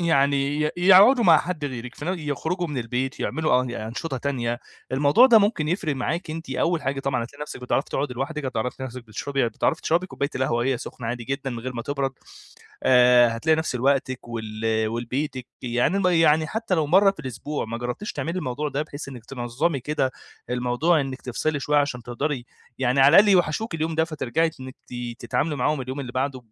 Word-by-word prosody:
يعني 140 -3 +2
ي 150 - +1
يقعدوا 195 +8 +7
مع 165 -4 +7
حد 165 -3 -4
غيرِك، 125 -2 -5
في 145 - -8
ن 180 +3 -2
يخرجوا 160 +4 -2
من 145 -4 -4
البيت 125 +3 -3
يعملوا 155 -5 +1
أن 125 - -5
أنشطة 120 +6 -4
تانية، 120 -3 -2 0.3
الموضوع 145 - +6
ده 235 -4 +7
ممكن 200 -7 +1
يفرق 165 -4 -1
معاكِ، 165 +6 -2
أنتِ 160 -2 -6
أول 165 +5 0
حاجة 140 0 -2
طبعًا 130 -3 -1
هتلاقي 140 +5 -9
نَفسِك 150 - -7
بتعرفي 125 +2 -1
تقعدي 135 -2 -2
لوحدِك، 145 +4 -4
هتعرفي 125 -1 -2
تلاقي 130 - -5
نَفسِك 125 0 -9
بتشربي 135 +4 -1
هتعرفي 115 +7 -1
تشربي 170 +3 +1
كوباية 140 -5 -3
القهوة 130 -2 0
وهي 125 +1 0
سخنة 120 0 -7
عادي 120 0 -3
جدًا 135 +2 -3
من 120 - -5
غير 130 +2 -5
ما 120 -1 -5
تبرد. 140 0 -2 0.7
آآ، 125 -1 +6
هتلاقي 160 +7 +2
نَفس 160 -4 -2
لوقتِك 130 -1 0
ول 110 -2 -6 0.2
ولبيتِك 125 +4 -3 0.2
يعني 125 +9 +1
ما 185 -2 +2
يعني 160 -1 +4
حتى 220 +2 -2
لو 160 -3 +1
مَرّة 195 +6 +5
في 195 - -9
الأسبوع، 135 +2 -4
ما 115 +1 -5
جربتيش 125 - -4
تعملي 170 +3 -3
الموضوع 150 -1 -3
ده 140 +1 -2
بحيث 150 -2 -8
إنِك 125 -5 -9
تنظمي 135 +5 -2
كده 135 0 -1 0.4
الموضوع 125 +7 +2
إنِك 135 -1 -5
تفصلي 145 +4 -2
شوية، 150 +2 +2
عشان 140 -4 -1
تقدري 125 +2 -3 0.3
يعني 130 +1 +2
على 140 +5 +7
الأقل 205 +1 +7
يوحشوكِ 180 +2 +2
اليوم 160 0 -1
ده، 160 0 +2
فترجعي 160 0 -1
إنِك 130 0 -9 0.4
تتعاملي 150 -1 -1
معاهم 140 +3 0
اليوم 130 +2 -5
اللي 125 -2 -6
بعده 130 +1 -1
140 Hz, 195 wpm, -24 LUFS, 125-160 Hz, 0.7 s, يقعدوا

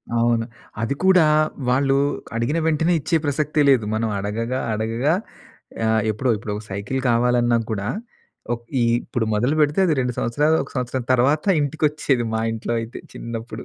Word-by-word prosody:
అవును. 115 -1 +2 0.4
అది 115 +5 -1
కూడా 190 -2 +6 0.5
వాళ్ళు 135 +2 +2 0.4
అడిగిన 120 +7 0
వెంటనే 160 +2 +2
ఇచ్చే 165 +3 +1
ప్రసక్తే 150 +1 0
లేదు. 125 -6 +4
మనం 110 +1 0
అడగగా 115 +5 -2
అడగగా 115 +7 0 0.7
ఆహ్, 110 0 +2
ఎప్పుడో 115 +4 0
ఇప్పుడు 105 0 -5
ఒక 105 - -6
సైకిలు 100 +7 -3
కావాలన్నా 120 0 +3
కూడా 105 -1 -2 0.6
ఒక 120 - -2 0.2
ఈ - - +3 0.2
ఇప్పుడు 120 - -2
మొదలు 120 +8 +1
పెడితే 150 +4 +2
అది 160 - +2
2 125 -1 -1
సంవత్సరాలు, 150 +7 +2
ఒక 140 - -10
సంవత్సరం 125 0 -2
తర్వాత 135 +5 +2 0.2
ఇంటికొచ్చేది. 145 -3 0
మా 110 - 0
ఇంట్లో 115 +1 -4
అయితే 115 +1 -7 0.2
చిన్నప్పుడు. 115 0 -6
125 Hz, 155 wpm, -22 LUFS, 115-145 Hz, 0.7 s, కూడా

